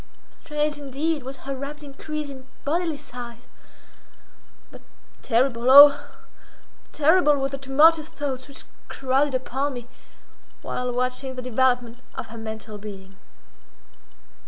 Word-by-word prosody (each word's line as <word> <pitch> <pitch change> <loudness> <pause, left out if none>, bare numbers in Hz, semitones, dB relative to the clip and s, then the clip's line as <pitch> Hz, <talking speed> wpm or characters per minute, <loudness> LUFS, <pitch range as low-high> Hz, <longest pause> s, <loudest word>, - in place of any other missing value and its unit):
Strange, 300 -1 -2
indeed, 290 +3 -2
was 265 +1 -8
her 275 0 -3
rapid 285 +3 -7
increase 295 +1 -6
in 265 -1 -12 0.2
bodily 325 +1 -1
size—but 245 -4 -15 0.4
terrible, 240 0 +1
oh! 285 +1 +11 1.0
terrible 310 0 +4
were 270 0 -1
the 275 0 -6
tumultuous 300 +4 +4
thoughts 270 -3 -5
which 280 - -10 0.2
crowded 270 +1 0
upon 265 +2 -2
me 240 -1 -8 0.8
while 250 0 -3
watching 255 +2 -3
the 255 - -5
development 245 -1 0 0.2
of - - -5
her 230 - -10
mental 220 -1 -7
being. 195 -2 -10
270 Hz, 115 wpm, -24 LUFS, 245-290 Hz, 1.0 s, oh